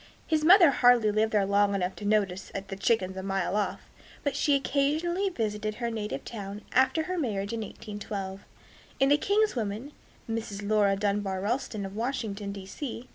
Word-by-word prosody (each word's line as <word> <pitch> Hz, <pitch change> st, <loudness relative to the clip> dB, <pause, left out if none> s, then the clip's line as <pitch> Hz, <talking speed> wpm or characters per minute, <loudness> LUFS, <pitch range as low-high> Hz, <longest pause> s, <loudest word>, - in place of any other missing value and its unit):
His 310 Hz, -1 st, +1 dB
mother 345 Hz, -2 st, +8 dB
hardly 245 Hz, -4 st, +5 dB
lived 215 Hz, +1 st, +1 dB
there 205 Hz, -2 st, +3 dB
long 200 Hz, 0 st, +3 dB
enough 185 Hz, -1 st, -1 dB
to 205 Hz, -, -7 dB
notice 200 Hz, -3 st, 0 dB, 0.2 s
the 195 Hz, -, -5 dB
chickens 195 Hz, -2 st, +1 dB
a -, -, -3 dB
mile 195 Hz, 0 st, -1 dB
off, 195 Hz, -2 st, -1 dB, 0.4 s
but 285 Hz, -2 st, -1 dB
she 290 Hz, 0 st, +3 dB
occasionally 310 Hz, +8 st, +1 dB
visited 215 Hz, -, -2 dB
her 235 Hz, 0 st, -2 dB
native 210 Hz, -11 st, -4 dB
town 205 Hz, -2 st, -7 dB
after 265 Hz, +5 st, +3 dB
her 365 Hz, +2 st, -3 dB
marriage 205 Hz, -6 st, -2 dB
in 230 Hz, -, -2 dB
1812, 205 Hz, -2 st, -6 dB, 0.6 s
and 270 Hz, +1 st, +4 dB
a 290 Hz, -, +6 dB
kinswoman 280 Hz, -, 0 dB, 0.4 s
(Mrs. 215 Hz, -3 st, -4 dB
Laura 205 Hz, -2 st, +3 dB
Dunbar 200 Hz, -1 st, -1 dB
Ralston, 215 Hz, -1 st, -2 dB
of 195 Hz, +1 st, -8 dB
Washington, 220 Hz, -4 st, -3 dB
D. 200 Hz, -1 st, -8 dB
C.) 250 Hz, +3 st, -6 dB
215 Hz, 170 wpm, -28 LUFS, 200-265 Hz, 0.6 s, mother